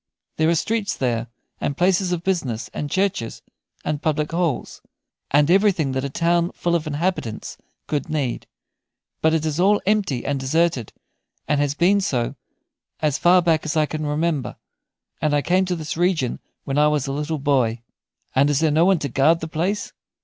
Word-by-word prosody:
There 155 Hz, +1 st, +3 dB
are 170 Hz, -, +3 dB
streets 215 Hz, +4 st, -1 dB
there, 120 Hz, -3 st, -1 dB, 0.3 s
and 140 Hz, -, -2 dB
places 180 Hz, 0 st, +2 dB
of 175 Hz, -1 st, -2 dB
business, 140 Hz, -12 st, -2 dB
and 145 Hz, -, -4 dB
churches, 190 Hz, -, -1 dB, 0.4 s
and 150 Hz, -1 st, -2 dB
public 150 Hz, -1 st, 0 dB
halls, 165 Hz, -5 st, -2 dB, 0.5 s
and 145 Hz, +3 st, +3 dB
everything 190 Hz, -7 st, +3 dB
that 130 Hz, 0 st, -2 dB
a 140 Hz, -, -2 dB
town 170 Hz, +4 st, +1 dB
full 175 Hz, -, -1 dB
of 165 Hz, -2 st, 0 dB
inhabitants 150 Hz, -, -2 dB, 0.3 s
could 145 Hz, -3 st, -2 dB
need; 145 Hz, -6 st, -2 dB, 0.7 s
but 160 Hz, 0 st, +3 dB
it 160 Hz, -1 st, -1 dB
is 155 Hz, +1 st, -2 dB
all 205 Hz, +3 st, +4 dB
empty 195 Hz, -, 0 dB
and 140 Hz, -1 st, -1 dB
deserted, 135 Hz, -3 st, 0 dB, 0.6 s
and 145 Hz, -1 st, +2 dB
has 145 Hz, -1 st, 0 dB
been 190 Hz, +5 st, +3 dB
so 125 Hz, -10 st, -1 dB, 0.7 s
as 150 Hz, -2 st, 0 dB
far 180 Hz, +1 st, +5 dB
back 165 Hz, -2 st, +2 dB
as 160 Hz, +1 st, -2 dB
I 155 Hz, -, +4 dB
can 155 Hz, +1 st, -4 dB
remember, 150 Hz, -1 st, -1 dB, 0.7 s
and 150 Hz, -1 st, +2 dB
I 145 Hz, -, +1 dB
came 185 Hz, +2 st, +2 dB
to 180 Hz, -1 st, -1 dB
this 155 Hz, -2 st, -5 dB
region 170 Hz, -7 st, 0 dB, 0.2 s
when 135 Hz, +1 st, -1 dB
I 150 Hz, -, +5 dB
was 150 Hz, -3 st, +1 dB
a 135 Hz, -, -3 dB
little 150 Hz, +2 st, -2 dB
boy." 130 Hz, -5 st, +1 dB, 0.5 s
"And 140 Hz, +2 st, +4 dB
is 145 Hz, -2 st, +2 dB
there 160 Hz, -1 st, +2 dB
no 160 Hz, +3 st, +4 dB
one 190 Hz, -1 st, +4 dB
to 145 Hz, -, -3 dB
guard 140 Hz, +6 st, +3 dB
the 160 Hz, -, -5 dB
place?" 180 Hz, +7 st, -2 dB
155 Hz, 185 wpm, -22 LUFS, 140-175 Hz, 0.7 s, far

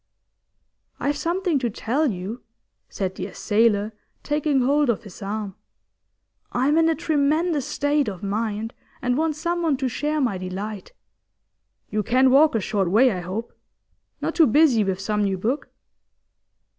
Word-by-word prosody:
'I've 285 Hz, +1 st, 0 dB
something 340 Hz, 0 st, 0 dB
to 245 Hz, -2 st, -1 dB
tell 265 Hz, +8 st, 0 dB
you,' 200 Hz, +4 st, -5 dB, 0.5 s
said 190 Hz, -2 st, -3 dB
the -, -, -5 dB
assailer, 210 Hz, -1 st, +1 dB, 0.3 s
taking 295 Hz, -2 st, +1 dB
hold 285 Hz, +2 st, +2 dB
of 230 Hz, -, 0 dB
his 200 Hz, -2 st, -12 dB
arm. 205 Hz, 0 st, -4 dB, 1.0 s
'I'm 280 Hz, +6 st, +3 dB
in 325 Hz, 0 st, +4 dB
a 325 Hz, -, +2 dB
tremendous 310 Hz, -1 st, +1 dB
state 290 Hz, -2 st, +1 dB
of 190 Hz, -3 st, -5 dB
mind, 215 Hz, +2 st, -2 dB, 0.3 s
and 250 Hz, 0 st, +1 dB
want 315 Hz, +1 st, 0 dB
someone 335 Hz, -2 st, 0 dB
to 265 Hz, -, -1 dB
share 300 Hz, +5 st, -1 dB
my 235 Hz, -9 st, 0 dB
delight. 190 Hz, +2 st, -6 dB, 1.0 s
You 215 Hz, 0 st, 0 dB
can 255 Hz, +4 st, +3 dB
walk 290 Hz, 0 st, +5 dB
a -, -, +3 dB
short 195 Hz, -2 st, -1 dB
way, 240 Hz, +7 st, +5 dB
I 185 Hz, -, -3 dB
hope? 185 Hz, +6 st, -5 dB, 0.7 s
Not -, -, -1 dB
too 325 Hz, -, +5 dB
busy 255 Hz, -3 st, +4 dB
with 190 Hz, -1 st, -2 dB
some 210 Hz, +1 st, -1 dB
new 195 Hz, -1 st, 0 dB
book? 235 Hz, +10 st, -2 dB
245 Hz, 150 wpm, -23 LUFS, 205-295 Hz, 1.0 s, walk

